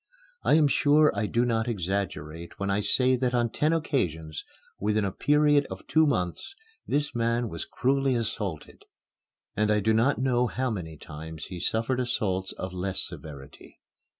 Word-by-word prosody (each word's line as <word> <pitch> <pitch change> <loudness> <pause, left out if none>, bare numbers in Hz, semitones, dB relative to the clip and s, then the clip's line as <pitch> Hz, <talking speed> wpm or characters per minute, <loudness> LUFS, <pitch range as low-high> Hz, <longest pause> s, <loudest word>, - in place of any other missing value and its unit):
I - - +4
am 155 -2 +5
sure 150 +2 +4
I 105 - 0
do 120 +3 +1
not 115 -1 0
exaggerate 85 -6 -3
when 100 0 -1
I 100 - +1
say 130 +4 +3
that 125 0 0
on 120 -2 +1
ten 155 +1 +1
occasions, 80 - -1 0.4
within 105 +1 +1
a 95 - -1
period 145 +3 +3
of - - -8
two 160 0 +4
months, 90 - -2 0.3
this 145 +1 0
man 115 0 0
was 85 -2 -4
cruelly 135 0 +1
assaulted, 105 -8 -4 0.7
and 105 +1 +1
I 105 0 +3
do 110 +2 +2
not 120 +5 +3
know 125 -1 +2
how 130 +1 -2
many 80 -7 -5
times 80 +1 -8
he 90 - -7
suffered 115 +8 0
assaults 95 -6 -1
of 95 0 -6
less 90 +1 -2
severity. 70 -2 -11
110 Hz, 165 wpm, -27 LUFS, 90-130 Hz, 0.7 s, am